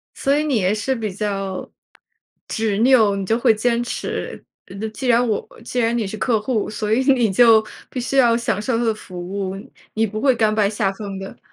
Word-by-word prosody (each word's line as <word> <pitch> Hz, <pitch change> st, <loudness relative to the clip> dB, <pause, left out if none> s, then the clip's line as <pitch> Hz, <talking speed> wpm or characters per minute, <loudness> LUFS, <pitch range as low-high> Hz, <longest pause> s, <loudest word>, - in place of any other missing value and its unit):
所 280 Hz, +1 st, +1 dB
以 300 Hz, -, +1 dB
你 295 Hz, -4 st, 0 dB
也 190 Hz, -1 st, +1 dB
是 215 Hz, +5 st, -1 dB
比 220 Hz, -4 st, -3 dB
较， 195 Hz, -2 st, -3 dB, 0.8 s
执 220 Hz, -3 st, -1 dB
拗， 225 Hz, -4 st, +5 dB
你 195 Hz, -1 st, -3 dB
就 225 Hz, +4 st, +1 dB
会 235 Hz, -, +4 dB
坚 235 Hz, +2 st, 0 dB
持。 240 Hz, -, -5 dB, 0.2 s
呃， -, -, -12 dB
这 220 Hz, -, -2 dB
既 220 Hz, +4 st, -5 dB
然 240 Hz, 0 st, +4 dB
我 215 Hz, -3 st, -1 dB, 0.2 s
既 245 Hz, +1 st, -3 dB
然 235 Hz, 0 st, +1 dB
你 225 Hz, -, -1 dB
是 195 Hz, -, -5 dB
客 225 Hz, 0 st, +1 dB
户， 215 Hz, 0 st, -1 dB
所 210 Hz, 0 st, -3 dB
以 240 Hz, -, +3 dB
你 235 Hz, -5 st, +1 dB
就 220 Hz, +1 st, +6 dB, 0.2 s
必 255 Hz, -, -5 dB
须 255 Hz, +3 st, -2 dB
要 240 Hz, -3 st, +5 dB
享 215 Hz, -4 st, -1 dB
受 230 Hz, +2 st, 0 dB
它 240 Hz, -, 0 dB
的 225 Hz, -1 st, +2 dB
服 185 Hz, -4 st, -10 dB
务， 190 Hz, +1 st, -4 dB, 0.4 s
你 220 Hz, +1 st, +1 dB
不 215 Hz, 0 st, -5 dB
会 265 Hz, -1 st, +4 dB
甘 220 Hz, -2 st, +2 dB
拜 210 Hz, -2 st, +2 dB
下 205 Hz, -2 st, 0 dB
风 200 Hz, -1 st, -7 dB
的。 195 Hz, 0 st, -9 dB
220 Hz, 240 characters per minute, -21 LUFS, 205-240 Hz, 0.8 s, 就